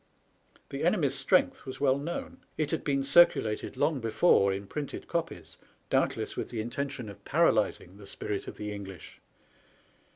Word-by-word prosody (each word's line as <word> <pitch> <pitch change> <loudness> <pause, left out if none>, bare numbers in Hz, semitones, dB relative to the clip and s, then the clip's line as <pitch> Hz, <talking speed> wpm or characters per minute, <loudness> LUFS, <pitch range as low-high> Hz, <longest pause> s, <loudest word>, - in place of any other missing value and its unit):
The - - -4
enemy's - - +2
strength - - +2
was 130 0 -8
well 135 -1 +3
known. 165 +4 -5 0.2
It 155 -2 -1
had 160 - -1
been 140 -2 +1
circu 170 +6 +7
lated 105 -1 -4
long 155 -4 +1
before 115 - +3
in 100 +1 -4
printed 145 +6 -6
copies, 165 -1 -4 0.3
doubtless - - 0
with - - -4
the 115 - -5
intention 130 +2 -4
of 100 0 -11
paralyzing 95 +3 +1
the 100 -1 -12
spirit 100 0 -4
of - - -8
the 105 0 -4
English. 95 -4 -9
125 Hz, 160 wpm, -29 LUFS, 100-145 Hz, 0.3 s, circu